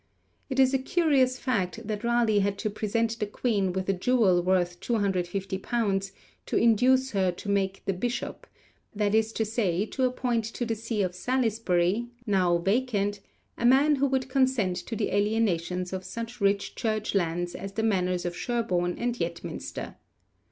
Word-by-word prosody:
It 265 -1 -2
is 260 0 +5
a 270 - +3
curious 265 -3 +2
fact 225 -4 -2
that 215 0 -3
Raleigh 235 -3 +3
had 200 0 0
to 215 +1 -2
present 225 +2 -1
the 210 - -1
Queen 205 -3 0
with 190 +1 -3
a 195 - +3
jewel 190 -2 +3
worth 180 -1 +1
250_l._ 195 0 -1 0.4
to - - 0
induce 255 +3 +4
her 190 -3 +2
'to 175 - -10
make 195 -1 0
the 195 - 0
Bishop,' 240 +7 -4 0.5
that 205 0 +1
is 220 0 +2
to 220 - 0
say, 205 -4 0
to 260 +4 -3
appoint 250 -2 0
to 230 +2 -4
the 230 - -1
see 225 -1 -2
of 180 -1 -2
Salisbury, 220 -2 0 0.2
now 185 -5 +3
vacant, 205 +1 0 0.4
a 235 - 0
man 280 +4 +5
who 280 +1 +2
would 265 -1 0
consent 260 -9 +1
to 230 - -5
the 215 - -1
alienation 200 -4 +1
of 190 0 -4
such 230 +5 -7
rich 200 0 +1
Church 215 -1 -2
lands 175 -2 0
as 195 0 -7
the 220 - -2
manors 185 -4 +1
of 175 0 -3
Sherborne 180 -7 -1
and 240 0 -1
Yetminster. 170 0 -5
210 Hz, 165 wpm, -27 LUFS, 185-240 Hz, 0.5 s, is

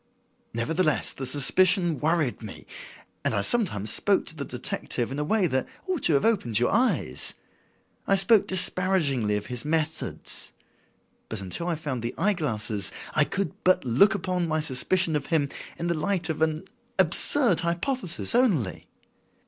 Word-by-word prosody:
Nevertheless, 155 +7 0
the 135 - -4
suspicion 170 +4 +3
worried 155 -5 0
me, 105 -3 -10 0.6
and - - -1
I 100 - +1
sometimes 110 - +1
spoke 200 -1 +1
to - - -6
the 145 - -5
detective 125 -1 -4
in 140 - -4
a - - -1
way 200 +5 +1
that 130 -5 -1 0.2
ought 370 -5 -2
to 160 - +5
have 140 - +1
opened 185 - +1
your 125 - +1
eyes. 245 +4 0 0.7
I 195 - +3
spoke 200 +2 +4
disparagingly 180 - +2
of 105 - -6
his 125 -1 -4
methods. 160 +1 -3 0.8
But 110 - -4
until 100 - -6
I 175 - -1
found 145 -6 -5
the 120 +1 -5
eye 210 +1 +2
glasses 110 - -2 0.2
I 150 - +3
could 200 +4 -3
but 185 -6 +2
look 140 - +4
upon 180 -2 -2
my 155 0 -1
suspicion 160 +4 +1
of 145 -2 -3
him 150 -4 0 0.3
in 170 - -4
the 170 - 0
light 175 +2 -2
of 155 -1 -4
an 160 +1 0 0.3
absurd 190 - +4
hypothesis 175 +4 +1
only. 195 - 0
160 Hz, 160 wpm, -25 LUFS, 130-185 Hz, 0.8 s, to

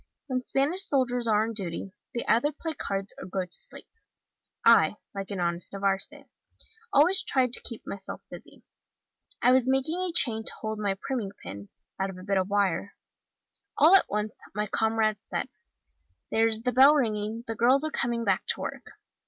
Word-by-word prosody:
When 255 -3 -2
Spanish 295 +8 +1
soldiers 245 -3 +1
are 215 -1 +3
on 225 +1 -3
duty, 190 -2 -5 0.2
they 235 - -2
either 245 +6 +3
play 320 +2 -5
cards 195 -8 -4
or - - -7
go 185 0 -2
to 180 - -25
sleep. - - -9 0.8
I, - - +6 0.2
like 195 -1 -5
an 200 -3 -4
honest 170 0 -2
Navarrese, 200 +9 -2 0.6
always 345 +7 +5
tried 255 -3 +1
to - - -4
keep 230 - -7
myself 195 -1 -7
busy. - - -12 0.8
I 250 - +6
was 260 0 +3
making 270 +6 +1
a 370 -1 -1
chain 230 -9 +2
to - - -5
hold 220 -1 -3
my 200 -2 0
priming 225 -7 -3
pin, 100 +3 -8 0.3
out 195 0 0
of 190 - -8
a 185 - -10
bit 195 0 +1
of 190 +1 -2
wire: 200 -1 0 0.8
all 320 +5 +7
at 390 - +4
once, 210 +1 -3 0.2
my 210 0 0
comrades 220 0 0
said, - - -3 0.8
'there's 225 0 +2
the 250 - +1
bell 270 +4 +7
ringing, 220 -3 -1
the 225 - -3
girls 250 +5 +4
are 310 - -2
coming 235 -2 -1
back 195 -2 +1
to - - 0
work. - - -6
225 Hz, 180 wpm, -27 LUFS, 200-260 Hz, 0.8 s, all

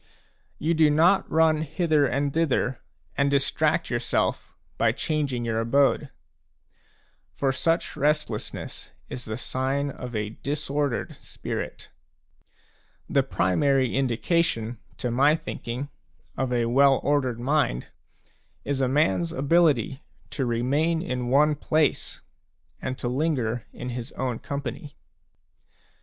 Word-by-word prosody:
You 160 +3 +1
do 155 -2 +5
not 165 +6 +4
run 160 -1 +3
hither 155 -2 +2
and 140 +1 -1
thither 140 -5 0 0.3
and 140 0 +2
distract 140 -1 +1
yourself - - -1 0.3
by - - +3
changing 140 -6 -1
your 115 -1 0
abode; 140 +4 +2 1.3
for 135 -1 +1
such 165 +6 0
restlessness 150 -7 -2 0.2
is 125 - -6
the 110 0 -4
sign 135 +3 -1
of 125 -2 -7
a 105 -1 -1
disordered 145 -2 -2
spirit. - - -6 1.2
The - - +3
primary 130 +7 +1
indication, 125 -2 0 0.2
to 125 - -2
my 140 +5 +4
thinking, 140 -4 -5 0.5
of 130 -1 -1
a 120 -1 +1
well 135 +3 +4
ordered 130 -4 +1
mind 130 - 0 0.8
is 140 -1 -1
a 130 - +3
man's 95 - +2
ability 140 -3 +2 0.3
to 135 -3 -1
remain 145 +8 +1
in 125 -8 -3
one 150 +4 +4
place 155 0 0 0.6
and 130 0 -3
linger 125 -3 -1
in 125 - -6
his 120 -1 -5
own 125 -3 -2
company. 140 +1 -5
135 Hz, 115 wpm, -26 LUFS, 125-150 Hz, 1.3 s, do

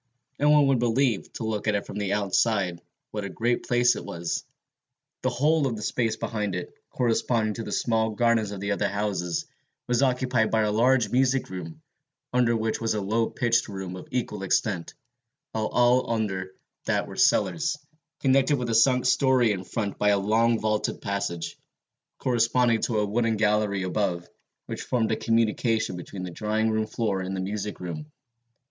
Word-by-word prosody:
No 145 - +3
one 150 -1 +6
would 135 -3 +3
believe, 120 -2 +1
to - - -5
look 110 -1 -2
at 105 - +2
it 100 - -2
from 105 - -6
the 100 -2 -1
outside, 100 -3 +1 0.3
what 105 -1 -4
a 100 - -4
great 120 +5 -1
place 120 0 +4
it - - -6
was. 85 0 -3 0.8
The - - +1
whole 150 +2 +2
of 120 - -2
the 105 - -6
space 115 0 0
behind 105 -4 -3
it, 90 - -5 0.2
corresponding 115 -2 +1
to 115 - -5
the - - -6
small 110 -1 +1
gardens 115 -1 +2
of 100 -2 -6
the 100 +1 -2
other 100 - +1
houses, 100 -4 -2 0.4
was 125 +1 +1
occupied 125 -4 +2
by 110 - +2
a 105 -1 +1
large 120 +2 +3
music 130 -2 +1
room, 80 -4 -7 0.5
under 120 -2 +3
which 110 0 -2
was 115 -1 0
a - - 0
low 110 +3 0
pitched 120 -2 +1
room 95 -3 -6
of 90 - -9
equal 115 -5 -3
extent, 95 -2 -1 0.6
while 110 -1 -1
all 125 +1 +3
under 95 -4 -2 0.3
that - - +1
were - - -9
cellars, 160 -2 +2 0.4
connected 135 +1 +3
with 125 -2 -3
the - - 0
sunk 125 +3 +4
story 130 -3 +4
in 95 -2 -3
front 100 +1 -4
by 105 - +3
a 100 - +4
long 110 +3 +2
vaulted 110 -1 -1
passage, 85 -4 -3 0.6
corresponding 120 -1 +2
to 115 - 0
a 105 - +2
wooden 110 +1 0
gallery 105 -2 +1
above, 90 -2 -1 0.4
which - - -5
formed 115 -3 0
a - - +2
communication 115 -2 +1
between 90 +2 -7
the 90 - -5
drawing 110 +4 0
room 110 0 0
floor 105 -5 -1
and 95 +1 -4
the - - -3
music 105 +2 -4
room. 150 - -6
110 Hz, 180 wpm, -26 LUFS, 100-120 Hz, 0.8 s, one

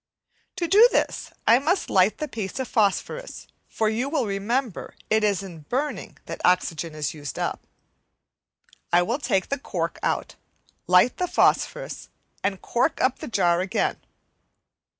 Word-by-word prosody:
To 340 - -1
do 430 +7 +7
this - - 0 0.2
I 235 +2 +6
must 340 +7 0
light 190 +2 +3
the 305 - -3
piece 215 -8 -5
of 260 -2 -2
phosphorus, 220 - -1 0.2
for 220 - -1
you 235 +5 -1
will 285 -5 0
remember 210 +3 -2 0.2
it 220 0 +3
is 200 -2 +1
in 175 -4 -9
burning 285 +4 -3
that - - -7
oxygen 170 -3 +1
is 150 -2 -2
used 145 -4 -7
up. - - -3 1.2
I 175 +1 +5
will 235 +9 -1
take 195 -9 0
the 280 - -1
cork - - -3
out, - - -1 0.5
light 180 +7 +5
the 360 - 0
phosphorus, - - +1 0.3
and 195 -1 -1
cork 250 +6 0
up 255 - +1
the - - -6
jar 175 -6 +2
again. 195 +4 0
215 Hz, 150 wpm, -24 LUFS, 185-265 Hz, 1.2 s, do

